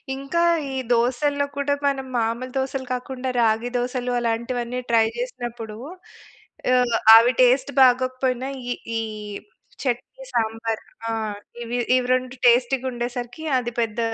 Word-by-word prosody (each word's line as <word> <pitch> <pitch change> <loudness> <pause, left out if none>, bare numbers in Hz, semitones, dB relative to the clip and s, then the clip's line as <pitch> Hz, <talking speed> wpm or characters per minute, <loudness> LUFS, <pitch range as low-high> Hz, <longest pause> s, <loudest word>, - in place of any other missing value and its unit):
ఇంకా 275 +5 -1 0.3
ఈ - - -5 0.2
దోసల్లో 285 +5 +1
కూడా 285 0 +1
మనం 270 -1 -1
మామూలు 235 +3 -1
దోసలు 265 0 -2
కాకుండా, 255 +1 -4
రాగి 225 +2 +2
దోసలు 250 0 -2
అలాంటివన్నీ 240 +1 -2
ట్రై 225 -1 +5
చేసినప్పుడు 240 -3 -5 1.0
ఆహ్, 245 -2 +3 0.2
అవి 235 +2 +7
టేస్ట్ 260 +3 +4
బాగోకపోయినా 255 0 +2 0.2
ఈ, - - 0 0.3
ఈ - - 0 0.8
చట్నీ, 265 - -3
సాంబార్ 225 0 -1 0.3
ఆహ్, 215 -2 -3 0.3
ఇవి, 240 +1 -3 0.2
ఇవి 250 -1 -1
2 255 0 -4
టేస్టీగా 250 +2 +3
ఉండేసరికి 240 +4 -5 0.2
అది 240 -1 -5
పెద్ద 225 0 -2
245 Hz, 125 wpm, -23 LUFS, 235-260 Hz, 1.0 s, అవి